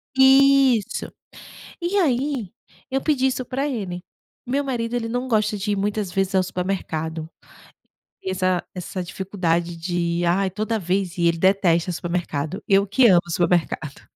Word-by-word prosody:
Isso! 265 -4 +4 0.7
E 350 +3 -1
aí, 265 - 0 0.4
eu 270 +1 0
pedi 265 -3 +2
isso 255 -1 -2
pra 270 +3 -2
ele. 195 -10 -4 0.4
Meu 275 +3 0
marido 240 -3 -2
ele 235 -2 -2
não 245 +2 -2
gosta 215 -2 +1
de 205 +1 -2
ir - - +1
muitas 205 -1 -2
vezes 195 0 0
ao 185 - +4
supermercado. 160 -4 -3 0.9
E 190 - -3
essa 185 -1 0
essa 185 +1 -5
dificuldade 175 -2 -2
de: 170 0 -1
"Ai, 190 +3 +2
toda 215 +4 -2
vez 185 -1 -1
ir!", 170 -1 +3
ele 165 0 +1
detesta 180 -2 +2
supermercado. 170 0 -3
Eu 195 0 +4
que 240 +5 +5
amo 180 -5 +6
supermercado 170 -4 0
195 Hz, 150 wpm, -22 LUFS, 175-245 Hz, 0.9 s, amo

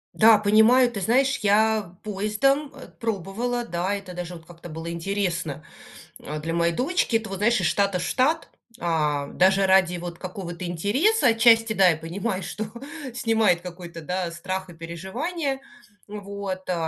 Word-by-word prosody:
Да, 220 -1 +7
понимаю, 220 +5 +5
ты 205 -5 -5
знаешь, 265 +7 +2
я 210 -2 +2
поездом, 215 +8 0
э, 270 - -11
пробовала, 230 +4 -2
да, 180 +1 -2
это 195 -2 -6
даже 180 0 -6
вот 165 -1 -13
как-то 175 0 -12
было 165 +1 -6
интересно, 170 -4 -2 0.6
э, 150 +1 -5
для 165 +2 -3
моей 170 0 +2
дочки. 255 - +1
Это 225 -2 -2
вот, 195 - -4
знаешь, 235 +4 +2
из - - +1
штата 200 -3 +1
в - - -3
штат. 305 +6 +1 0.3
А, 150 -4 0
даже 190 +4 +3
ради 190 -2 +4
вот 175 0 -7
какого-то 180 -1 -6
интереса, 235 - +1
отчасти, 225 0 +5
да, 195 -3 +5
я 165 - +3
понимаю, 185 +5 -4
что 215 - -4 0.5
снимает 225 -7 +2
какой-то, 175 -1 -9
да, 180 +1 -2
страх 185 +2 -5
и - - -12
переживания, 255 - -4 0.5
вот, 200 -2 -6
э, 180 - +1
195 Hz, 160 wpm, -24 LUFS, 175-225 Hz, 0.6 s, Да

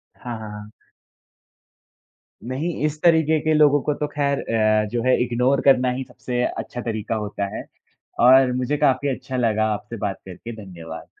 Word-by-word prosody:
हाँ, 120 -2 -6
हाँ, 110 -1 -7
हाँ। 105 0 -9 1.8
नहीं, 150 +7 -2
इस 150 0 -3
तरीके 160 -2 +4
के 155 0 +1
लोगों 145 -2 +5
को 150 - 0
तो 150 +1 -3
खैर 140 -1 -1
अ, 110 -1 +2
जो 120 -1 -1
है 130 - +4
इग्नोर 125 +3 +1
करना 130 -2 +5
ही 130 +1 -3
सबसे 125 -1 -4
अच्छा 115 +2 -5
तरीका 110 -1 -3
होता 105 -1 -3
है, - - -6 0.6
और 130 +1 +6
मुझे 130 +3 -1
काफ़ी 135 +1 +2
अच्छा 130 +1 -6
लगा 110 -3 +1
आपसे 105 +3 -7
बात 95 - -4
करके, 95 +6 -8
धन्यवाद। 85 -3 -10
125 Hz, 165 wpm, -22 LUFS, 110-140 Hz, 1.8 s, और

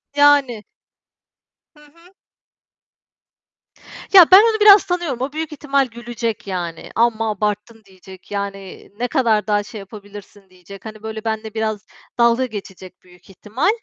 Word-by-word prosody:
Yani. 285 -6 +3 1.1
Hı 300 - -20
hı. 335 +5 -22 2.0
Ya, 370 -3 +10
ben 375 - +11
onu 445 0 +1
biraz 415 -1 +7
tanıyorum, 350 -9 -3
o 265 +2 -3
büyük 315 +1 -5
ihtimal 280 -2 -1
gülecek, 235 -2 -6
yani, 175 -3 -5
amma 225 -1 +1
abarttın 210 +2 -4
diyecek, 190 0 -16
yani, 200 -1 -7
ne 245 - -1
kadar 230 -7 0
daha 205 -1 +1
şey 215 +1 -10
yapabilirsin 205 -1 -13
diyecek, 185 +2 -15
hani, 215 -1 -10
böyle 220 -1 -7
benle 220 -1 -4
biraz 215 -1 -3 0.3
dalga 235 +2 +3
geçecek 195 -5 -10
büyük 180 0 -22
ihtimal. 210 - -2
220 Hz, 135 wpm, -19 LUFS, 200-270 Hz, 2.0 s, ben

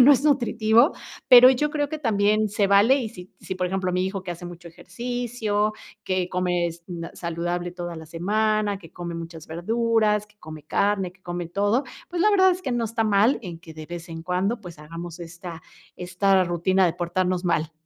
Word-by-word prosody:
que - - +10
no 280 - +8
es 280 +1 +4
nutritivo, 235 -1 +3 0.4
pero 250 +1 +10
yo 265 +3 +1
creo 290 -2 -2
que 310 - -4
también 215 -4 +2
se 205 0 +1
vale, 205 +7 +5
y 230 -6 -3
si 180 +1 -12
si, - - -6
por 180 0 -1
ejemplo, 185 0 -1
mi 180 +1 +1
hijo, 190 0 -4
que 180 - -6
hace 175 +1 -7
mucho 175 0 -10
ejercicio, 225 +1 -2 0.3
que 185 -2 -1
comes 175 -2 -1
na 170 -2 -6
saludable 175 +1 -3
toda 175 -1 -6
la 160 - -9
semana, 210 +4 0
que 165 -5 -14
come 175 -1 -6
muchas 165 -1 -8
verduras, 215 +4 +1
que 210 0 -28
come 155 -1 -10
carne, 200 -1 0
que 185 - -28
come 175 -2 -5
todo, 205 +9 +1 0.2
pues, 350 0 -1
la 425 - +5
verdad 375 -2 +5
es 365 +1 -2
que 260 -6 -2
no 235 -1 0
está 225 +1 -1
mal 215 +4 +3
en 175 -5 -7
que 165 -2 -13
de 155 - -8
vez 170 +1 -8
en 165 0 -7
cuando, 185 +6 -1
pues, 175 -4 -10
hagamos 165 +3 -8
esta 170 0 -8 0.4
esta 185 +1 +2
rutina 180 +2 +2
de 170 - 0
portarnos 180 +1 -1
mal. 160 -2 0
185 Hz, 205 wpm, -24 LUFS, 175-220 Hz, 0.4 s, que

